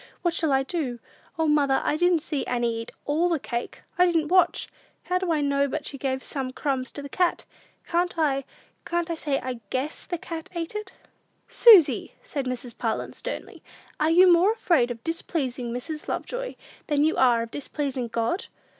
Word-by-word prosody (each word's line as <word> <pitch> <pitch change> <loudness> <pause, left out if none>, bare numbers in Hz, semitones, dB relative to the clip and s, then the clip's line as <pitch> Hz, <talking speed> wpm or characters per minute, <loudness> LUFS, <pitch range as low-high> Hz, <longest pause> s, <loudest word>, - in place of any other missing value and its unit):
"What 345 -2 +2
shall 320 -3 0
I 270 0 +3
do? 270 -5 -3 0.4
O, 320 -1 +1
mother, 285 -3 +3
I - - +1
didn't 350 -1 +3
see 295 -5 -2
Annie 240 -1 0
eat 230 0 -6
all 320 +5 +2
the 335 - +2
cake; 240 -3 -5 0.2
I 360 - +7
didn't 325 -3 +1
watch. 370 0 +3 0.4
How 365 0 0
do 365 -2 -1
I 310 -2 +2
know 280 0 +2
but 300 +1 -4
she 275 - -6
gave 265 -1 -2
some 265 -3 -3
crumbs 265 -1 -2
to 285 - -7
the - - -5
cat? 350 +5 0 0.4
Can't 350 +1 0
I 280 -4 +1 0.4
can't 345 0 -1
I - - +1
say, 295 -4 -1
I 255 -2 -5
guess 275 +4 -3
the 350 - -2
cat 325 -1 -7
ate 335 +2 -3
it?" 425 -2 -5 0.6
"Susy!" 425 - +6
said 285 - -4
Mrs. 250 -1 -4
Parlin, 225 -2 -2
sternly, - - -6 0.4
"are 310 +1 +3
you 355 +3 +7
more 365 +6 +4
afraid 315 - +2
of 230 -1 -6
displeasing 270 -7 -2
Mrs. 300 +6 -5
Lovejoy - - -4 0.3
than 295 -1 +2
you 315 - +2
are 240 -3 +4
of 230 - -9
displeasing 275 -3 -3
God? 230 - -1
295 Hz, 190 wpm, -26 LUFS, 260-340 Hz, 0.6 s, I